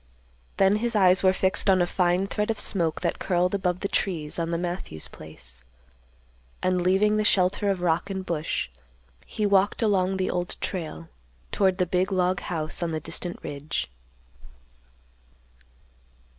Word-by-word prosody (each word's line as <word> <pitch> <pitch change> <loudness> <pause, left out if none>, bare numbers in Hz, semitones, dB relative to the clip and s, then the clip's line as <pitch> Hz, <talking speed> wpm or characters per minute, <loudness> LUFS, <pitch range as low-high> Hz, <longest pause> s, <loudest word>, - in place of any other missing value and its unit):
Then 195 +2 +4
his 235 +1 -2
eyes 185 -2 +5
were 185 - +5
fixed 190 +1 +1
on 190 -1 +5
a 175 - +3
fine 180 +1 +1
thread 210 +2 -2
of 220 -2 -1
smoke 170 -6 0
that - - -1
curled 180 0 +1
above 180 -2 0
the 200 - 0
trees 165 -6 -2
on 165 0 -1
the 170 - 0
Matthews 175 - -4
place; 65 -5 -11 1.0
and, 185 -1 +2
leaving 195 +4 +3
the 215 - +2
shelter 195 0 +2
of 190 -2 0
rock 175 +2 +1
and 190 -1 -4
bush, 155 - -2 0.6
he 215 - -2
walked 200 +2 +3
along 190 -3 +2
the 185 - 0
Old 175 -1 -2
Trail 165 -2 -5 0.4
toward 190 -2 +2
the 180 - +2
big 180 +2 0
log 185 0 +1
house 160 -2 -2
on 170 - 0
the 160 -1 -2
distant 175 +3 -5
ridge. 145 - -4
185 Hz, 155 wpm, -26 LUFS, 170-195 Hz, 1.0 s, eyes